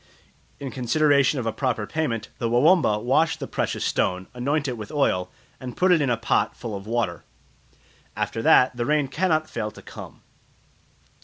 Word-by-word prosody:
In 135 -2 -5
consideration 140 +2 +2
of 125 - -3
a 115 - -1
proper 125 -6 -1
payment, 115 -7 -3
the 115 - -1
Wawamba 125 - +4
wash 155 +6 +2
the - - -5
precious - - -2
stone, 95 0 0
anoint 140 +4 -1
it 125 - -2
with 105 -2 -8
oil, 90 -11 +1 0.3
and 125 -1 -8
put 185 0 +3
it 170 -3 +4
in 140 - +1
a 120 - +1
pot 115 - 0
full 115 -4 -5
of 100 +1 -8
water. 110 -8 -2 0.9
After 115 - -2
that 125 +2 +5
the 120 -1 -2
rain 150 -2 +2
cannot 155 -3 0
fail 110 -6 -4
to - - -14
come. - - -11
125 Hz, 175 wpm, -24 LUFS, 115-150 Hz, 0.9 s, that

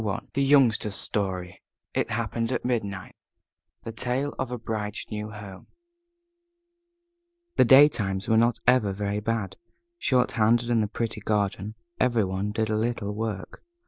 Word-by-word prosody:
I 100 -2 -2
THE 140 - 0
YOUNGSTER'S 130 -7 +3
STORY 95 -4 -3 0.3
IT - - 0
HAPPENED 115 +1 -2
AT - - -2
MIDNIGHT 100 -7 -3 0.7
THE 115 - -5
TALE 125 +5 -2
OF 130 - -2
A 125 - -3
BRIDE'S 110 -2 -4
NEW 105 0 -4
HOME 100 -3 -10 1.9
The - - +6
daytimes 115 -8 +5
were 110 - +3
not 115 +1 +3
ever 120 -6 +4
very 100 +1 -2
bad. 105 -3 -2 0.4
Short 125 -2 +2
handed 120 +1 +2
in 115 -2 +3
the 105 - 0
pretty 110 0 -4
garden, 105 0 -1 0.2
every 120 -3 +3
one 95 +2 -2
did 110 0 -1
a 110 - +1
little 110 -2 -2
work. 105 -2 -5
110 Hz, 145 wpm, -26 LUFS, 100-120 Hz, 1.9 s, The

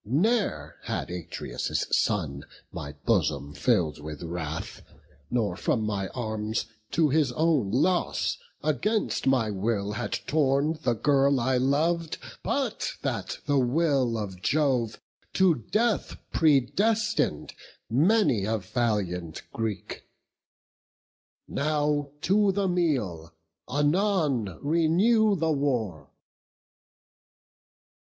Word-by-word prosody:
ne'er 140 - 0
had - - -3
Atreus' 90 -2 -3
son 70 -9 0 0.3
My 70 0 -6
bosom 70 +1 +1
fill'd 90 - +1
with 75 +1 -7
wrath, 80 -2 -5 0.5
nor 110 -7 0
from 110 +4 0
my 100 -2 -1
arms, 110 -2 -3 0.3
To 160 -2 +3
his 145 -2 +2
own 155 -8 +2
loss, 175 - +1 0.2
against 155 - 0
my 125 -5 +3
will 100 0 -1
had 105 - -3
torn 150 +1 +1
The 120 -2 +1
girl 140 +2 +3
I 130 +2 +1
lov'd, 155 +5 +1 0.2
but - - -1
that - - -2
the 145 -1 +2
will 130 -2 +2
of 95 -4 -5
Jove 130 -4 +1 0.3
To 190 -2 +5 0.2
death 225 -1 +1 0.2
predestin'd 190 - +2 0.3
many 145 - +3
a 110 +2 0
valiant 95 -7 -2
Greek. 110 -4 -4 1.5
Now 145 -1 0
to 200 +4 +3
the 195 0 0
meal; 115 - -1 0.3
anon 145 - +1
renew 185 +8 +3
the 160 -2 0
war." 125 - -1
130 Hz, 100 wpm, -27 LUFS, 105-160 Hz, 1.5 s, To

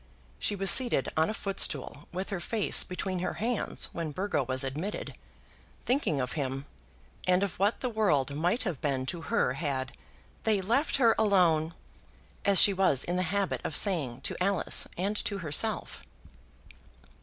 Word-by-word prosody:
She 205 - 0
was 195 -2 +4
seated 245 - +4
on 160 +1 +2
a - - -2
footstool 150 -9 0
with 185 +3 -5
her 195 - -2
face 215 +3 +1
between 185 0 -4
her 180 - -2
hands 235 0 -2
when 165 -2 -3
Burgo 185 +1 -1
was 130 +1 -2
admitted, 150 +10 -4 0.7
thinking 250 - +1
of 125 -1 -2
him, 135 -2 -3 0.6
and 185 +1 +3
of 200 -3 -4
what 200 +3 +1
the 255 - -1
world 150 - +1
might 175 - 0
have 175 - -4
been 135 -3 -1
to 165 +5 -5
her 125 - 0
had 135 -3 -3 0.5
"they 215 -2 +2
left 240 +12 +1
her 235 -4 +5
alone," 170 -6 +3 0.7
as 200 -2 +5
she 200 - +7
was 185 -8 +2
in 175 - -2
the 180 - 0
habit 200 0 -1
of 155 - -4
saying 145 - +1
to - - -3
Alice 195 -2 +1
and 195 +4 -1
to 200 - -3
herself. 185 +6 -1
180 Hz, 165 wpm, -29 LUFS, 145-200 Hz, 0.7 s, she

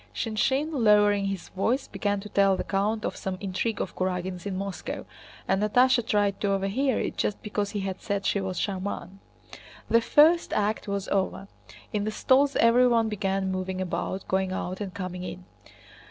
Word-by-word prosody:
Shinshín, 265 +7 0
lowering 210 -6 +4
his 195 -3 -4
voice, 235 +8 0
began 205 -1 -1
to 210 - -9
tell 195 -1 +3
the - - -2
count 210 +3 -1
of - - -2
some 190 -1 -4
intrigue 205 +3 -2
of - - -4
Kurágin's 185 0 -3
in 190 -2 -3
Moscow, 195 -1 -5 0.4
and 190 +1 +1
Natásha 245 +4 +4
tried 205 -4 +1
to 200 -1 +1
overhear 210 +7 0
it - - -3
just 210 - -1
because 205 -1 -2
he 205 -1 -3
had 190 -1 -4
said 200 -2 -2
she 200 - +1
was 190 -2 -4
"charmante." 195 -1 -4 0.7
The 230 - +5
first 320 +7 +4
act 210 0 0
was 200 -1 -2
over. 195 0 -1 0.5
In 210 -1 0
the 215 - -1
stalls 270 +5 +3
everyone 230 -1 +4
began 195 -2 -1
moving 185 0 -3
about, 185 +1 -3
going 190 0 0
out 185 +1 -4
and 200 -2 -4
coming 185 -2 -5
in. 185 0 -7
200 Hz, 175 wpm, -27 LUFS, 190-220 Hz, 0.7 s, The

